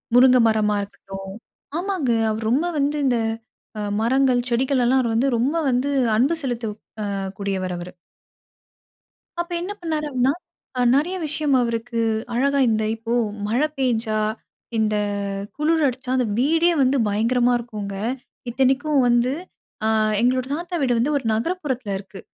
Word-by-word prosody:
முருங்க 255 0 +7
மரமா 215 -1 +2
இருக்கட்டும் 195 -1 -8 0.4
ஆமாங்க. 360 -8 -1 0.2
அவர் 220 0 -3
ரொம்ப 300 +7 +2
வந்து 290 +2 +1
இந்த 245 -2 +3 0.6
அ - - -2 0.2
மரங்கள், 255 +2 +3
செடிகளல்லாம் 255 +1 +2
அவர் 230 -2 -1
வந்து, 245 +5 +2
ரொம்ப 275 +8 +1
வந்து 255 +3 +1 0.3
அன்பு 275 +9 +3
செலுத்த 240 -4 -2 0.4
அ - - -2 0.2
கூடியவர் 190 -2 -2
அவரு. 175 +1 -7 1.5
அப்ப 345 +1 -3
என்ன 370 +4 -4
பண்ணாரு 310 -2 -2
அப்படீன்னா, 260 +1 +2 0.4
அ - - +2
நெறைய 340 +7 +1
விஷயம் 295 -2 0
அவருக்கு 235 0 -2 0.3
அழகா 280 +3 +2
இந்த 220 0 +1
இப்போ 225 +1 -4 0.3
மழை 250 +8 +2
பேஞ்சா, 225 -4 0 0.6
இந்த 215 -1 +1 0.6
குளிர் 315 +1 +2
அடிச்சா, 255 0 -4
அந்த 250 - +2
வீடே 325 +6 +3
வந்து 265 +2 +3
பயங்கரமா 240 +4 +2
இருக்குங்க. 210 -4 -6 0.6
இத்தனைக்கும் 270 +3 +2
வந்து 240 +1 +3 0.5
அ - - +3 0.3
எங்களோட 255 +1 +2
தாத்தா 345 +2 -5
வீடு 245 -3 +2
வந்து, 255 +6 +1
1 265 - -5
நகரப்புறத்தில 260 - -2
இருக்கு. 195 0 -11
250 Hz, 135 wpm, -22 LUFS, 225-280 Hz, 1.5 s, முருங்க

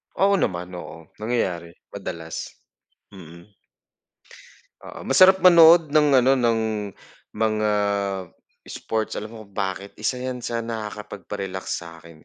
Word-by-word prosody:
Oo 200 0 +3
naman, 90 - -2
oo 80 0 -11
nangyayari 90 -7 -2 0.2
madalas. 85 -5 -6 0.6
Mm. 85 0 -14 1.3
Oo - - -10
masarap 190 0 +6
manood 170 -2 +7
ng 150 +1 +3
ano 130 +2 +3
ng 120 -3 +1 0.7
mga 110 -1 0 1.0
sports 110 -1 -3
alam 105 - -5
mo 110 -2 -11
kung 100 - -26
bakit? 100 0 -4
Isa 125 +4 -2
yan 125 -1 -4
sa 115 0 -2
nakakapagpa-relax 105 -4 -6 0.2
sa'kin 85 -1 -14
105 Hz, 115 wpm, -23 LUFS, 90-125 Hz, 1.3 s, manood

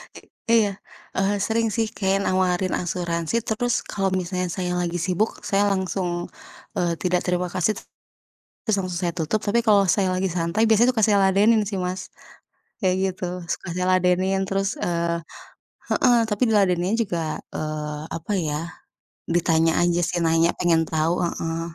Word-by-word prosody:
I - - -10 0.4
iya, 205 - 0 0.5
eee, 195 +2 +2
sering 225 0 +1
sih 225 -1 +1
kayak 195 0 0
nawarin 185 -1 +1
asuransi 170 +1 -2
terus 240 +2 0
kalau 195 -1 -2
misalnya 180 0 -2
saya 180 +1 -3
lagi 175 -1 -2
sibuk 190 +4 +1 0.2
saya 200 +1 +3
langsung, 190 -1 -1 0.7
eee, 175 -1 +1
tidak 180 -1 +1
terima 180 0 0
kasih 185 +4 +1
tet - - -10 0.8
terus 215 -4 +1
langsung 180 -2 -3
saya 170 -2 -1
tutup 170 +6 -1
tapi 225 +3 +2
kalau 205 -2 +5
saya 190 +1 +3
lagi 185 +1 0
santai 170 +4 -1
biasanya 235 +3 +5
suka 225 - -1
saya 205 -1 +4
ladenin 210 +4 +4
sih 200 -2 -3
Mas, 180 +1 -2 0.8
kayak 185 -3 +2 0.2
gitu 180 - -7 0.3
suka - - -6
saya 180 0 -1
ladenin 185 +1 +2
terus, 195 0 0
eee 170 -1 0 0.7
heeh, 245 -2 +4
tapi 210 +2 0
di - - +2
ladeninnya 185 0 +2
juga, 165 -6 -3 0.2
eee, 150 -1 -4
apa 165 +5 -6 0.2
ya, 150 0 -1 0.7
ditanya 165 -1 +3
aja 175 0 +2
sih 175 - -1
nanya 165 +1 +3
pengen 165 -2 +3
tahu 160 +1 +1
heeh, 165 -1 -2
185 Hz, 160 wpm, -23 LUFS, 170-200 Hz, 0.8 s, kalau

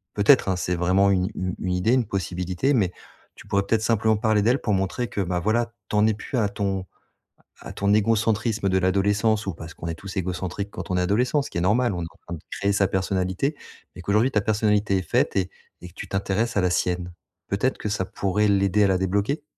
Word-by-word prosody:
peut-être, 105 +2 +5
hein, 95 - +1
c'est 90 0 -1
vraiment 90 +3 +3
une 90 -1 +1
u 90 -1 -3
une 90 - -2
idée, 90 +6 +2
une 130 -2 +2
possibilité, 95 - -1
mais 100 -9 +2 0.4
tu - - -14
pourrais 100 0 +1
peut-être 110 +2 +1
simplement 110 -1 +2
parler 110 -1 +2
d'elle 120 +6 +2
pour 105 - -1
montrer 95 +6 -1
que, 100 - -3
bah, 90 -1 -1
voilà, 115 +5 0 0.2
tu - - -2
en 105 0 +4
es 110 - +2
plus 110 +5 -5
à 105 -4 +2
ton 100 -2 -2 0.8
à - - -8
ton 100 +1 +1
égocentrisme 110 -1 +1
de 95 - +2
l'adolescence 100 +4 +1
où 95 - -2
parce 80 0 -10
qu'on 85 - -8
est 85 - -2
tous 95 +4 -9
égocentrique 95 +2 -3
quand - - -7
on 90 - +1
est - - +2
adolescent. 120 +10 +2
Ce 140 - -7
qui - - -6
est - - 0
normal, 110 +6 +2
on 90 - -3
est - - -3
en - - -24
train 85 - -7
de - - -10
créer 100 0 0
sa 100 -1 +3
personnalité 95 +7 -1 0.4
et 90 - -9
qu'aujourd'hui 105 +8 +2
ta 105 - +2
personnalité 105 -1 +1
est - - 0
faite - - 0
et 95 -2 0 0.3
et 90 - -9
que - - -21
tu - - -8
t'intéresses 100 +4 -1
à - - +4
la 90 - +2
sienne. 90 0 -1 0.4
Peut-être 100 +7 0
que 105 - -4
ça 100 -2 -1
pourrait 100 +2 0
l'aider 100 +1 +3
à - - +4
la 95 -1 +2
débloquer? 100 - -1
100 Hz, 235 wpm, -24 LUFS, 95-110 Hz, 0.8 s, peut-être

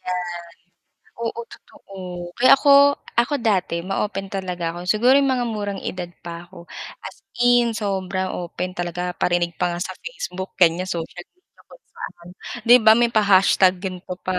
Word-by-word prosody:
Ayan. 180 0 -3 1.0
Oo 235 0 -3
totoo, 195 - -15 0.4
kaya 255 +1 +6
ako 280 +1 +4 0.5
ako 240 +5 +2
dati 185 -6 0
ma-open 195 +1 -3
talaga, 180 -3 -3
ako 175 +1 -8
siguro 235 +7 +4
yung 280 - +2
mga 245 -2 -1
murang 205 -3 -4
edad 180 -1 -4 0.2
pa 170 -1 -8
ako. 170 0 -15 0.3
As - - -9 0.3
in 240 -2 +4
sobrang 190 -3 -2
open 180 +1 -4
talaga 175 +1 -3
parinig 175 -1 0
pa 175 -1 0
nga 175 - -5
sa - - -5
Facebook 195 - -7
ganyan, 175 +1 +3
social 175 0 -5
media 365 - -28
kung - - -18
saan 170 0 -10 0.4
'di 245 +1 +9
ba, 220 0 +8
may 235 0 +2
pa-hashtag 195 -3 +4
ganto 185 -1 -5
pa. 185 -1 -1
190 Hz, 160 wpm, -22 LUFS, 175-225 Hz, 1.0 s, di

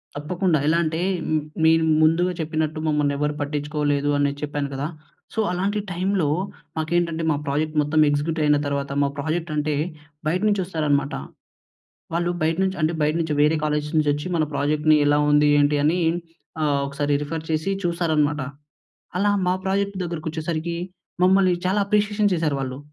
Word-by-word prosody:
తప్పకుండా 165 +2 0
ఎలా 165 +2 +3
అంటే, 160 +1 -1 0.6
మీరు 160 0 +5 0.2
ముందుగా 165 +3 +3
చెప్పినట్టు 155 -1 -2
మమ్మల్ని 150 -1 +1
ఎవరు 150 +1 0
పట్టించుకోలేదని 145 -1 0
చెప్పాను 145 -1 -2
కదా! 140 +3 -2 0.5
సో - - -3
అలాంటి 195 +4 -1
టైమ్‌లో 185 -1 0 0.5
మాకేంటంటే, 165 +1 0
మా 145 - +1
ప్రాజెక్ట్ 155 +3 -1
మొత్తం 155 +2 +2
ఎగ్జిక్యూటివ్ 150 +2 0
అయిన 150 0 +4
తర్వాత 140 -1 -2
మా 140 - +2
ప్రాజెక్ట్ 160 +3 -2
అంటే, 150 0 0 0.5
బయట 175 +4 +1
నుంచి 205 -2 +1
వస్తారన్నమాట. 145 -5 0 1.0
వాళ్ళు 175 +1 +1
బయట 160 +2 +1
నుంచి 190 0 -1
అంటే 155 +2 +2
బయట 150 0 +2
నుంచి 160 -2 -1
వేరే 150 +2 +4
కాలేజ్స్ 150 0 -1
నుంచి 150 -1 +3
వచ్చి, 150 +4 -4
మన 160 - +2
ప్రాజెక్ట్‌ని 150 +2 +3
ఎలా 145 0 +4
ఉంది? 150 0 +5
ఏంటి? 145 +1 +3
అని 170 +4 +2 0.6
ఆహ్, 145 -2 +2
ఒకసారి 145 +1 -1
రిఫర్ 160 +2 -4
చేసి 155 +5 0
చూస్తారన్నమాట. 155 -4 +1 0.8
అలా 205 +2 +2 0.2
మా 180 - +3
ప్రాజెక్ట్ 200 +1 0
దగ్గరకి 170 -2 -5
వచ్చేసరికి 160 +1 -3 0.5
మమ్మల్ని 185 0 +5
చాలా 190 +3 +2
అప్రిషియేషన్ 210 0 +1
చేశారు 160 -4 0
వాళ్ళు. 130 -1 -4
155 Hz, 150 wpm, -23 LUFS, 145-175 Hz, 1.0 s, మీరు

